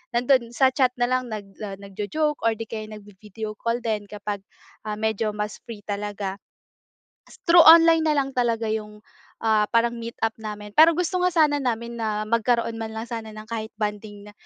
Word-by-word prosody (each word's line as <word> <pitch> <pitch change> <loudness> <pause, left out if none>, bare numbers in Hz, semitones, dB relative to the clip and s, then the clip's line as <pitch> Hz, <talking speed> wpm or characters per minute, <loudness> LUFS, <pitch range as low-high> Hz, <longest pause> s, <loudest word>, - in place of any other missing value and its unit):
Nando'n 240 -1 +2
sa 265 -1 +4
chat 255 -1 +2
na 245 0 0
lang 255 -1 0
nag, 205 -3 -8
ah, 200 -2 -5
nagjo-joke 215 +10 -2
or 225 - +4
'di 225 0 -7
kaya 215 -1 -5
nagvi-video 210 0 -9
call 235 +1 -2
din 210 -3 -2
kapag, 205 -1 -5 0.5
ah, 210 - -2
medyo 220 0 -1
mas 210 -1 -4
free 225 -3 -9
talaga. 205 -1 -4 0.9
S - - -16
through 340 0 +8
online 330 0 +8
na 305 - +3
lang 275 -1 0
talaga 230 -3 0
yung, 210 -1 -5 0.4
ah, 215 -2 +3
parang 235 0 +2
meet 230 0 -6
up 225 - +3
namin, 210 -1 -7
pero 325 +1 +8
gusto 360 +2 -1
nga 360 - +2
sana 300 -3 +4
namin 235 -3 -3
na 215 -1 -1
magkaroon 230 +1 0
man 220 0 -5
lang 220 - -4
sana 220 -2 -6
ng 215 +1 -11
kahit 220 -1 -5
bonding 210 -1 -5
na - - -19
220 Hz, 190 wpm, -24 LUFS, 210-245 Hz, 0.9 s, through